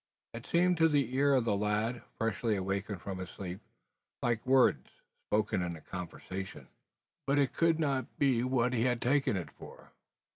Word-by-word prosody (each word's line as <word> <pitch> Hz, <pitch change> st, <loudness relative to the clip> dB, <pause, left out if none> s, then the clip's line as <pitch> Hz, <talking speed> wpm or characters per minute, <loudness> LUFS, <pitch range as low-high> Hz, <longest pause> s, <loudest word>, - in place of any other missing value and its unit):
It 115 Hz, +1 st, -8 dB
seemed 180 Hz, +1 st, +3 dB
to 165 Hz, 0 st, +5 dB
the 140 Hz, -5 st, +1 dB
ear 140 Hz, +1 st, +4 dB
of 125 Hz, -3 st, +2 dB
the 105 Hz, -, +2 dB
lad 105 Hz, +4 st, 0 dB, 0.2 s
freshly 110 Hz, 0 st, 0 dB
awakened 95 Hz, 0 st, -3 dB
from 95 Hz, -2 st, -5 dB
his 90 Hz, -, -6 dB
sleep 95 Hz, +1 st, -7 dB, 0.6 s
like 120 Hz, -2 st, 0 dB
words 130 Hz, -1 st, +4 dB, 0.4 s
spoken 105 Hz, -3 st, +1 dB
in 85 Hz, -2 st, -4 dB
conversation. 95 Hz, +2 st, -7 dB, 0.6 s
But 140 Hz, +1 st, +2 dB
it 140 Hz, -2 st, +2 dB
could 165 Hz, -1 st, +2 dB
not 140 Hz, -4 st, -1 dB
be 130 Hz, -4 st, +2 dB
what 125 Hz, -1 st, +1 dB
he 115 Hz, -1 st, +1 dB
had 125 Hz, -2 st, +1 dB
taken 135 Hz, -4 st, +2 dB
it 80 Hz, -6 st, -5 dB
for! -, -, -13 dB
115 Hz, 170 wpm, -32 LUFS, 100-135 Hz, 0.6 s, to